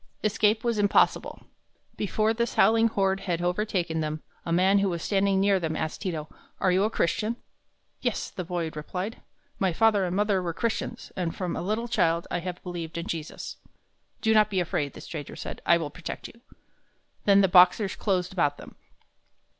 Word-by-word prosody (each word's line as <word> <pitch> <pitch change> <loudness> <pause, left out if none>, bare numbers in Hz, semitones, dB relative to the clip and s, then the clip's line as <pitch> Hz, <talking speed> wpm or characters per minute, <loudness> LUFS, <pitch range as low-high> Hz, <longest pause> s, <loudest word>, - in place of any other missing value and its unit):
Escape 215 +1 +2
was 235 -3 0
impossible. 205 -1 +2 0.5
Before 215 +2 +1
this 235 +1 -2
howling 225 +1 +5
horde 195 -3 +1
had 175 -4 -2
overtaken 175 -2 -1
them, 155 0 -3 0.2
a - - -2
man 190 +4 +4
who 195 0 +2
was 170 -2 -3
standing 195 -1 +2
near 195 0 +3
them 160 -2 -2
asked 155 0 -3
Ti 195 - -1
to, 155 -2 -4 0.3
"Are 185 - +3
you 185 +2 +3
a - - +1
Christian?" 215 +3 0 0.7
"Yes," - - -2
the 185 - -5
boy 170 -2 -3
replied. 180 +8 -5 0.4
"My 190 -3 +1
father 215 +1 +3
and 180 0 -2
mother 205 -1 +2
were 170 -2 -3
Christians, 230 -1 -3
and 175 -3 -2
from 180 -2 -3
a - - -3
little 215 +6 -1
child 170 -8 +1
I - - 0
have 180 0 -6
believed 170 -2 -5
in 170 - -3
Jesus." 160 -2 -5 0.6
"Do 220 -1 +3
not 215 -1 +5
be 195 -3 0
afraid," 150 -5 -1
the - - -10
stranger 150 -4 -7
said; - - -7
"I 170 - +6
will 155 -3 -4
protect 180 +3 -7
you." 230 - -17 0.8
Then 200 -1 +6
the 195 - +5
Boxers 185 +2 +5
closed 185 -3 -1
about 145 -6 +1
them. - - -11
185 Hz, 185 wpm, -27 LUFS, 170-210 Hz, 0.8 s, I